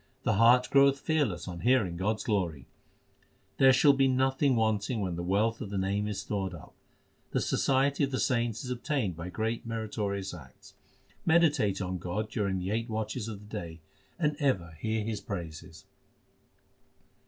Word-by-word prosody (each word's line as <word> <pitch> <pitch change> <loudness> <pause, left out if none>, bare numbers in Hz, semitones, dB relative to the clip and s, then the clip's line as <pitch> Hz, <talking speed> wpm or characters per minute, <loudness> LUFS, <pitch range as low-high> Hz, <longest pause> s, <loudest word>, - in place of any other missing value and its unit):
The 110 - +2
heart 120 +4 +5
groweth 140 0 +5
fearless 135 - 0
on 90 -2 -6
hearing 115 -8 +2
God 100 +5 0
s - - -7
glory. 85 - -1 0.9
There 135 -1 +7
shall 140 +2 +6
be 135 -1 +3
nothing 130 +1 +2
wanting 110 +1 0
when 90 -4 -2
the 85 - -4
wealth 105 +6 0
of 100 - -5
the 100 - -3
Name 100 +2 0
is 105 -2 -3
stored 95 -3 -3
up. 80 - -13 0.6
The - - +2
society 135 +2 +1
of - - -6
the 130 - -2
saints 120 -2 0
is 125 - -4
obtained 125 - -1
by 85 +2 -6
greatly 115 +3 -3
meritorious 105 -4 -3
acts. 70 -7 -13 0.5
Meditate 150 - +3
on 90 0 -3
God 105 +6 -3
during 100 -4 -1
the 90 +2 -3
eight 115 +2 -1
watches 110 +1 -3
of 105 -3 -7
the - - -5
day, 85 -1 -9 0.4
and 150 -3 +1
ever 95 - 0
hear 110 -1 -1
His 110 -2 -3
praises. 80 -4 -7
110 Hz, 170 wpm, -29 LUFS, 95-125 Hz, 0.9 s, There